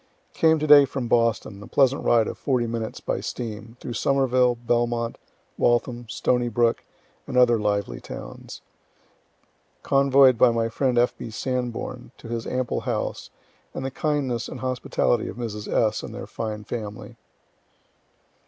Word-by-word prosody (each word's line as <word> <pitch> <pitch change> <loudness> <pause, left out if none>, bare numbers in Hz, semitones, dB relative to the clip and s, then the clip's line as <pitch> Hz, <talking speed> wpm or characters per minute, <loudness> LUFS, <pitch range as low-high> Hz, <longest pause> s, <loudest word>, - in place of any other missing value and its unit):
Came 160 -1 +4
to 155 - -2
day 145 -2 +8
from 130 -2 -4
Boston, 115 -3 +1
(a 105 - -10
pleasant 135 +1 +2
ride 115 -2 +4
of - - -4
40 125 -4 0
minutes 115 -1 -4
by - - -2
steam, 115 0 -6
through 120 - -6
Somerville, 130 0 +2
Belmont, 120 0 -1 0.4
Waltham, 120 0 +1
Stony 120 0 0
Brook, 115 +1 +1 0.4
and - - -3
other 120 -2 +5
lively 100 -11 -1
towns,) - - -9 1.2
convoy'd 135 -3 +5
by 125 - +7
my 115 -1 0
friend 125 +1 0
F. 120 +1 +3
B. - - -7
Sanborn, 125 +1 -3
and 120 +1 -17
to 115 - -11
his 115 -1 -4
ample 125 -1 -1
house, - - -3 0.5
and 130 - -4
the 135 - -3
kindness 135 -5 -1
and - - -8
hospitality 125 -2 0
of - - -7
Mrs. 105 -3 -5
S. 110 -1 +1
and 110 - -8
their 120 0 -6
fine 110 -2 -5
family. 105 -2 -6
120 Hz, 155 wpm, -24 LUFS, 115-130 Hz, 1.2 s, day